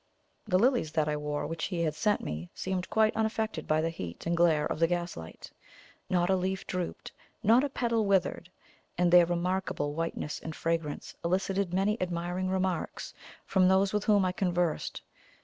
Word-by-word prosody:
The 185 -3 +3
lilies 235 - +2
that 155 -2 +1
I 150 - 0
wore, 150 0 -3
which 165 0 -3
he 175 -3 -2
had 155 -2 0
sent 210 +6 +1
me, 80 +3 -5
seemed 185 -1 -3
quite 220 0 +3
unaffected 220 -5 -1
by 155 0 +2
the 165 +1 -1
heat 90 - -7
and 170 +1 +1
glare 165 -3 +3
of - - -3
the 165 - +4
gaslight 175 - -5 0.6
not 175 -1 +2
a 190 - +3
leaf 190 +1 -2
drooped, 180 -2 -4 0.3
not 230 +5 +5
a 290 - 0
petal 230 -5 0
withered; 185 -2 +1 0.5
and 175 0 +3
their 175 -1 +8
remarkable 175 -4 -1
whiteness 165 -2 -3
and 160 -1 -7
fragrance 165 -3 -2
elicited 190 +1 0
many 195 +4 +1
admiring 175 +1 -2
remarks 185 -2 -2 0.3
from 185 -1 +3
those 190 +1 +3
with 210 0 0
whom 205 -3 +4
I 185 - +1
conversed. 175 -3 -1
180 Hz, 175 wpm, -29 LUFS, 165-195 Hz, 0.6 s, their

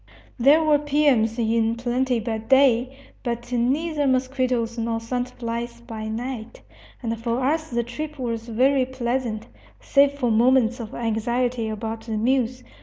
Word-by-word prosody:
There 290 +6 +6
were 300 -2 +4
piums 280 -6 +2
in 225 0 +1
plenty 245 +1 0
by 220 0 -3
day, 255 +1 +4 0.3
but 240 0 -4
neither 290 +5 +1
mosquitoes 255 -3 0
nor 230 0 -1
sand 245 +2 -3
flies 235 0 -4
by 225 -2 -7
night; 235 +1 -5 0.4
and 230 -1 -1
for 235 +1 -1
us 315 +3 0
the 235 -1 0
trip 300 +6 -6
was 230 -3 -3
very 260 +3 +3
pleasant, 240 -3 -2 0.3
save 280 0 +3
for 255 -5 0
moments 245 +1 +3
of 225 -2 -7
anxiety 235 +1 -1
about 220 +1 -4
the 220 -1 -2
mules. 250 +2 0
240 Hz, 145 wpm, -23 LUFS, 230-260 Hz, 0.4 s, There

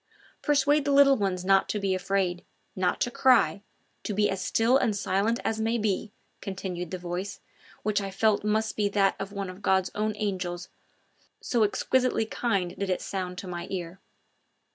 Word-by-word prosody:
"Persuade 290 0 +3
the 285 - +1
little 275 -1 +6
ones 190 -5 -1
not 195 0 +4
to 210 - -1
be 195 -1 0
afraid, 185 -1 -1 0.3
not 185 -1 0
to 245 - +1
cry, 230 -10 +4 0.4
to 210 - -4
be 210 +1 +2
as 195 - -3
still 230 +3 +2
and 240 -6 +2
silent 205 +3 0
as 220 0 -1
may 225 +2 +1
be," 210 -1 -1 0.3
continued 185 -3 -5
the 185 - -4
voice, 180 +3 -5 0.4
which 210 -1 +1
I 195 - -4
felt 205 +2 +1
must 215 +1 0
be 205 -1 +1
that 200 -1 +2
of 195 0 -5
one 200 -1 -4
of 185 +2 -9
God's 190 -2 +2
own 215 +1 -1
angels, 185 -4 -3 0.7
so 235 - 0
exquisitely 250 +2 +1
kind 200 -6 -1
did 200 -1 -2
it 185 - +1
sound 180 -2 -4
to 190 - -6
my 175 -1 -5
ear. 180 -1 -5
200 Hz, 180 wpm, -27 LUFS, 185-220 Hz, 0.7 s, little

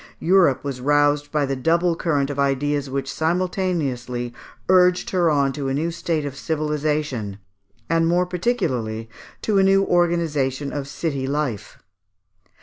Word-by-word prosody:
Europe 175 -6 +3
was 135 -3 -4
roused 145 +1 +2
by 150 -2 +1
the 135 0 -2
double 170 +5 +2
current 145 -5 0
of 140 - -5
ideas 140 +1 0
which 135 +1 -3
simultaneously 160 -9 -1 0.3
urged 180 -1 +4
her 175 -3 +3
on 140 -3 +2
to 140 -1 -4
a 135 - -1
new 165 +4 -1
state 165 -2 -2
of 140 -1 -5
civilisation, 150 -8 -2 0.5
and 165 0 +2
more 175 +2 +2
particularly 150 - -2 0.4
to 205 -3 +2
a - - +5
new 195 0 +4
organization 155 -7 0
of 140 -2 -4
city 140 -3 -3
life. 140 -7 -3
150 Hz, 145 wpm, -22 LUFS, 135-170 Hz, 0.5 s, a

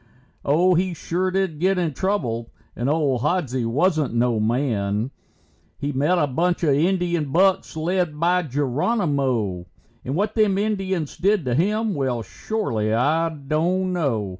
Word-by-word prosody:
Oh, 175 +6 +3
he 180 0 0
sure 180 +3 -1
did 185 -5 -1
get 190 +3 +2
in 170 -4 0
trouble, 125 - -2 0.3
and 120 +3 -1
old 145 -5 +1
Hodsie 135 -6 0
wasn't 150 0 +1
no 120 -1 +2
man. 110 -1 0 0.7
He 145 - -3
met 145 +7 +1
a 150 - +3
bunch 170 +6 0
of 150 -4 +3
Indian 170 -1 +1
bucks 185 0 +2
led 165 -1 -1
by 175 +2 +3
Geronimo, 135 - -1 0.4
And 130 - -3
what 205 +4 0
them 210 -3 +2
Indians 195 -6 -2
did 200 -3 +2
to 125 - 0
him, 210 - +1
well, 130 -6 -1
shorely 115 - -2
I 155 +9 +2
don't 165 +5 -1
know. 125 - -1
155 Hz, 145 wpm, -23 LUFS, 130-185 Hz, 0.7 s, Oh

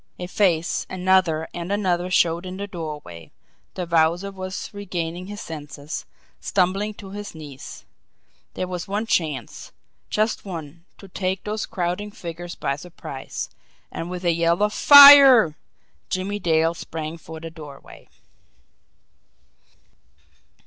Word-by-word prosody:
A 180 - -5
face, 180 -3 0
another, 180 -4 +2
and 175 +2 -5
another 180 -3 0
showed 170 -1 +2
in 185 +1 -7
the 200 - -4
doorway 150 - -8 0.5
the 180 - -3
Wowzer 170 +3 +1
was 185 -1 -6
regaining 180 -3 -5
his 205 0 -7
senses, 150 -1 -7 0.3
stumbling 195 +3 0
to 195 -2 -11
his 205 -2 -7
knees. 145 -4 -10 0.7
There 185 - -3
was 180 -1 -5
one 205 +3 -2
chance 150 - -2 0.4
just 215 +1 0
one 170 -3 -8
to 195 - -13
take 185 +1 -3
those 215 +1 -3
crowding 180 +3 -3
figures 175 -3 -8
by 140 0 -2
surprise. 145 -5 -7 0.4
And 165 - -5
with 180 0 -6
a 170 - +3
yell 170 +3 +1
of 210 0 +1
"Fire!" 280 - +9 0.5
Jimmie 195 +2 -2
Dale 165 -2 +2
sprang 160 -1 -6
for 160 0 -10
the 165 0 -8
doorway. 150 -4 -13
175 Hz, 130 wpm, -23 LUFS, 160-195 Hz, 0.7 s, Fire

